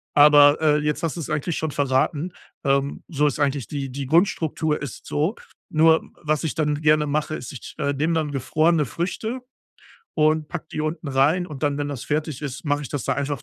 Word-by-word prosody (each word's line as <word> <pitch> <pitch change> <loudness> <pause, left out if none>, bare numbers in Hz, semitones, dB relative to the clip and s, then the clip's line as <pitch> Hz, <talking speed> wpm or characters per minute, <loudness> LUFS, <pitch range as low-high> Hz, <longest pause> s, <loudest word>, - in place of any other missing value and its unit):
aber, 145 0 +7
äh, 150 -1 +4
jetzt 150 +2 -1
hast 165 +1 -1
du's 155 - -5
eigentlich 155 +2 -1
schon 155 -2 -2
verraten, 145 +5 0 0.3
ähm, 140 0 0
so 150 -2 +2
ist 145 - -2
eigentlich 140 -3 0
die 140 -2 -4
die 140 +1 -4
Grundstruktur 160 -2 +1
ist 145 - -7
so. 160 +9 0 0.3
Nur, 160 +1 +4 0.2
was 155 +1 0
ich 155 - -2
dann 150 -1 0
gerne 150 0 +4
mache, 150 +1 -1
ist, 125 +1 -7
ich, 130 - -9
äh, 140 -2 0
nehme 155 +4 0
dann 155 -3 0
gefrorene 155 +4 +2
Früchte 220 - -3 0.7
und 155 0 +2
packe 170 -2 -6
die 155 - -3
unten 155 0 -3
rein 150 +7 +2
und 150 -4 -9
dann, 145 -1 +1
wenn 145 0 -2
das 140 -4 -5
fertig 150 -2 -2
ist, 140 +1 -5
mache 145 0 0
ich 135 - -6
das 145 -4 -4
da - - 0
einfach 140 -2 -3
150 Hz, 205 wpm, -23 LUFS, 140-160 Hz, 0.7 s, aber